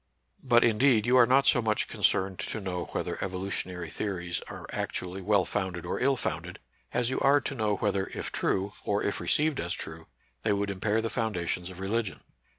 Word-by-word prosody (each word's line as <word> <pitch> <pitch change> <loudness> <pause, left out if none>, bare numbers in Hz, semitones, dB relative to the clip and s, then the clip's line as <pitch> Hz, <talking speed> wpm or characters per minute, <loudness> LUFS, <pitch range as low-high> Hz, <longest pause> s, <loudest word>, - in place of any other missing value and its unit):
But, 120 -3 +5
indeed, 115 0 +4
you 125 +1 +4
are 120 -2 +7
not 135 +2 +4
so 125 - +5
much 110 -2 0
concerned 95 -1 +1
to - - -3
know 90 -3 -3
whether - - -3
evolutionary 90 -3 -4
theories 90 -4 -3
are - - -8
actually 90 +1 -3
well 100 -1 +3
founded 95 -4 -3
or 85 - -2
ill 135 +1 +3
founded, - - -3 0.3
as 120 +1 0
you - - 0
are 140 +1 +5
to - - -3
know 110 -5 0
whether 100 -2 0
if - - -5
true, 95 +1 0
or 100 0 0
if 100 - -1
received 150 -2 +2
as - - -1
true,' 80 +1 -7 0.3
they 110 - +2
would 100 0 0
impair 105 +3 0
the 115 - -1
foundations 90 -6 -1
of 95 0 -10
re 95 - -3
ligion. 110 -2 -1
100 Hz, 195 wpm, -29 LUFS, 95-115 Hz, 0.3 s, are